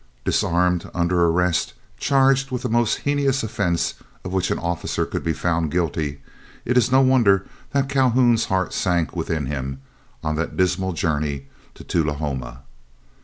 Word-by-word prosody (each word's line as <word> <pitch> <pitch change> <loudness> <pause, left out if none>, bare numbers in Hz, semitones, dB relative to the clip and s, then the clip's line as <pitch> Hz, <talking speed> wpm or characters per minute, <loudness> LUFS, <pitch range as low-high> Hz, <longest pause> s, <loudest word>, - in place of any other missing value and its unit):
Disarmed, 90 0 +1
under 85 0 +2
arrest, 85 0 +1 0.3
charged 135 0 +3
with 125 -1 -4
the 125 - -1
most 120 -1 +1
heinous 140 -2 +1
offence 100 -6 0 0.3
of 90 - -6
which 95 -1 0
an - - 0
officer 85 -1 -2
could - - -4
be 80 - 0 0.4
guilty, 75 -4 -2 0.4
it 125 - 0
is 125 0 +3
no 130 +1 +6
wonder 115 -8 +4 0.3
that 140 -1 +1
Calhoun's 125 -4 +3
heart 95 -4 -1
sank 85 -4 0
within 80 -3 -2
him 65 -1 -4 0.4
on 75 0 -1
that 85 - -3
dismal 95 0 +1
journey 75 -4 -2 0.3
to - - -12
Tullahoma. 70 -6 -2
90 Hz, 145 wpm, -22 LUFS, 80-120 Hz, 0.4 s, no